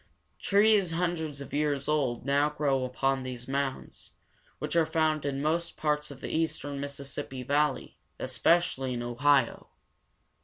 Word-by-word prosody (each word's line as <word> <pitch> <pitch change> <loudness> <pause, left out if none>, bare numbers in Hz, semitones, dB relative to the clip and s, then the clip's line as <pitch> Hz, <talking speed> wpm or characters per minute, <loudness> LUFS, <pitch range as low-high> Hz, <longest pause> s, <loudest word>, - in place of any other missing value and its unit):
Trees 200 -3 +4
hundreds 160 -4 -2
of 140 - -9
years 145 -2 0
old 135 -6 0
now 140 +1 +3
grow 140 -3 0
upon 135 +1 0
these 125 -1 -6
mounds, 135 0 -4 0.4
which - - -4
are 165 - +5
found 155 -2 0
in 140 0 -2
most 170 +2 -1
parts 150 -1 0
of 140 -1 -11
the - - -4
eastern 145 -3 -1
Mis 140 0 -4
sis 140 -1 -7
sip´pi 130 -3 -5
valley, 145 +1 0 0.2
especially 130 +1 +1
in 120 - -3
O 120 0 -4
hi´o. 140 -2 +2
145 Hz, 155 wpm, -29 LUFS, 135-155 Hz, 0.4 s, are